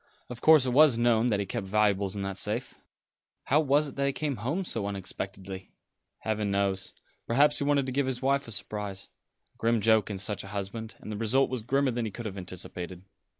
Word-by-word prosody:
Of 120 - -8
course, 155 -4 +7
it 125 - 0
was 140 -2 +6
known 120 0 +3
that 105 -4 +1
he 100 - -1
kept 95 0 -4
valuables 100 -1 +1
in 100 - -3
that 95 0 -3
safe." 115 +5 -1 0.7
"How 145 - +3
was 145 0 +3
it - - -12
that 140 0 +1
he - - +2
came 145 -2 -2
home 145 - -2
so 110 -10 -2
unexpectedly?" 95 -1 -6 0.5
"Heaven 110 -2 -1
knows. 100 -1 0 0.4
Perhaps 145 +5 +4
he 140 - -1
wanted 140 -2 +2
to 130 - -3
give 135 +1 0
his 130 -2 -2
wife 140 +1 +1
a - - -6
surprise 100 -1 -3 0.4
a - - -34
grim 115 0 +2
joke 110 -1 +3
in 100 - -3
such 100 +1 -1
a - - -9
husband; 110 +3 -5
and 110 - -7
the 105 - -4
result 120 +6 +2
was 130 -3 -2
grimmer 135 +4 +1
than 120 -1 -2
he - - -2
could 120 +4 -7
have 100 -3 -4
anticipated." 90 0 -7
110 Hz, 220 wpm, -28 LUFS, 100-135 Hz, 0.7 s, course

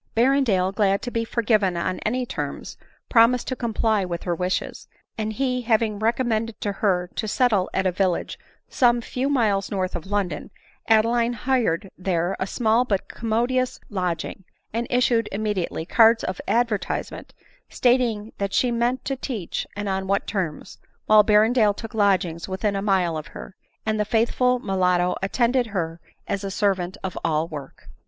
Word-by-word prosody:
Berrendale, 230 -7 +3
glad 200 -1 +1
to 245 - -4
be 230 -1 -1
forgiven 215 -6 +1
on 185 +2 -2
any 250 +3 -1
terms, - - -5 0.3
promis 235 +1 +5
ed - - -23
to 255 - -3
comply 220 -3 0
with 175 -2 -4
her 175 - -1
wishes; 180 +2 -3 0.3
and 220 0 -3
he 255 +1 -1
having 220 -3 +1
recom 230 +4 +1
mended 225 -1 -1
to 205 - -1
her 180 -3 0
to 215 - -3
settle 210 -4 +2
at 190 - -1
a 185 - +3
village 185 -1 -1 0.3
some 240 -2 +3
few 255 +3 -2
miles 215 -8 +1
north 185 -2 -2
of 175 +1 -6
London, 200 -2 -2 0.4
Adeline 230 +2 +3
hired 225 -7 0
there 180 -1 0
a 190 - -1
small 230 +2 +2
but 200 -6 -1
commodious 240 +3 -1
lodging, 180 -1 -3 0.3
and 235 +1 -2
issued 245 -2 +2
immediately 200 -5 -2
cards 225 +4 +5
of 185 - -3
advertisement, 235 -3 -1 0.3
stating 235 -4 +1
what 200 -1 -2
she 250 - +2
meant 240 +2 0
to 270 - -1
teach, 235 - -4
and 205 0 -4
on 190 0 -2
what 200 +1 +1
terms; 180 -7 -4 0.3
while 215 0 +7
Berrendale 215 0 +4
took 225 0 -8
lodgings 190 -6 +1
within 200 +2 -1
a 195 - -1
mile 190 -5 +1
of 155 - -6
her, 190 - -10 0.3
and 215 -1 0
the 210 - +1
faithful 235 +3 +2
mulatto 180 -4 +1
attended 240 +5 +1
her 170 -5 -3 0.3
as 200 - -2
a 195 - -3
servant 190 -2 0
of 190 -2 -4
all 160 0 +1
work. 145 - -9
210 Hz, 165 wpm, -23 LUFS, 190-235 Hz, 0.4 s, while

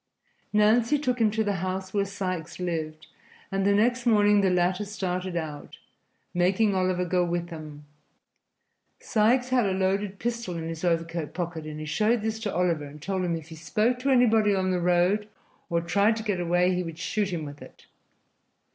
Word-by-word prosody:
Nancy 225 +6 +4
took 250 -4 -1
him 220 - +5
to 220 +1 0
the 205 -2 -1
house 190 0 -3
where 200 -1 +1
Sikes 185 -4 -4
lived, 160 -3 -3 0.5
and 195 0 0
the - - +4
next 240 +3 +2
morning 205 -2 +5
the 195 - +3
latter 180 +2 +1
started 185 -3 -3
out, 155 -3 -6 0.6
making 190 +4 +2
Oliver 185 -1 +1
go 180 0 +1
with 175 0 -2
him. 150 -2 -9 1.1
Sikes 245 +4 +2
had 250 -4 +3
a 190 - 0
loaded 195 +1 0
pistol 235 -5 -3
in 165 0 -4
his 165 0 -6
overcoat 165 -3 -1
pocket, 165 -3 -4
and 155 0 -6
he 155 - -5
showed 210 +9 +1
this 220 0 -2
to 215 -3 -3
Oliver 170 -4 +1
and 145 +1 -11
told 190 +4 -2
him 170 -2 0
if 165 -1 -8
he 160 - -9
spoke 215 +9 0
to 270 +2 -1
anybody 225 -5 +4
on 185 -1 0
the 180 -1 0
road 180 +4 +2 0.4
or 170 -1 +1
tried 200 +6 +2
to 220 - -5
get 205 -4 -1
away 175 +1 +2
he 180 - 0
would 165 -2 -6
shoot 205 +4 -1
him 165 -3 -3
with 145 0 -9
it. - - -14
185 Hz, 190 wpm, -26 LUFS, 170-210 Hz, 1.1 s, him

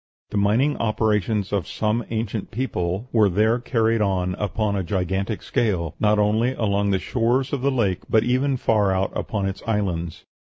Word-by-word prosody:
The - - -2
mining 110 +9 +2
operations 105 -2 0
of 100 -4 0
some 110 +2 -1
ancient 110 -2 -3
people 100 -3 -2
were 110 -3 +4
there 110 +6 +2
carried 115 -2 +1
on 90 -3 0
upon 105 +1 -1
a 95 - 0
gigantic 95 +3 -2
scale, 90 -9 0
not 105 0 +3
only 110 +4 +2
along 100 -2 0
the 95 - +2
shores 125 +6 0
of 140 - -1
the 140 - +2
lake 105 -9 0
but 110 -1 +4
even 130 +3 +1
far 105 -5 +2
out 95 0 0
upon 100 -3 -2
its 95 0 -5
islands. 90 -7 -2
105 Hz, 170 wpm, -23 LUFS, 95-115 Hz, -, were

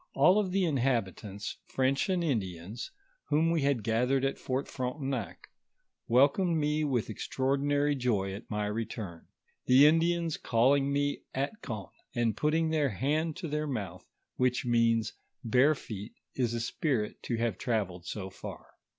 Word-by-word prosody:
All 180 +9 +5
tho 190 0 -2
inhabitants, 120 - -1
French 135 +5 +1
and 180 -2 +1
Indians, 100 - -3 0.4
whom 160 +3 +2
we 165 -2 +1
had 140 -5 +1
gathered 125 +5 +2
at 135 - -1
Fort 130 +2 -2
Frontenac, 130 -2 -4 0.6
welcomed 145 +8 +4
mo 150 0 +1
with 125 -5 0
ex - - -6
traordinary 145 +2 +1
joy 105 -7 0
at 100 - -9
my 105 -1 -1
return; 105 -5 -5 0.4
tho 125 - +5
Indians 165 +3 +4
calling 135 +4 +3
me 145 0 0
Atkon, 130 - -4 0.2
and 115 -2 +1
putting 160 +1 +1
their 150 -3 +2
band 155 +5 0
to 180 -2 -5
their 150 0 -2
mouth, 100 -10 -5 0.3
which 125 0 +1
means, 115 -2 +2 0.3
Barefoet 125 -4 +1 0.2
is 120 -3 0
a - - -1
spirit 120 -3 -1
to 120 - -2
have 115 -4 -1
travelled 95 -7 -2
so 95 -2 -5
far. - - -9
130 Hz, 140 wpm, -30 LUFS, 115-150 Hz, 0.6 s, All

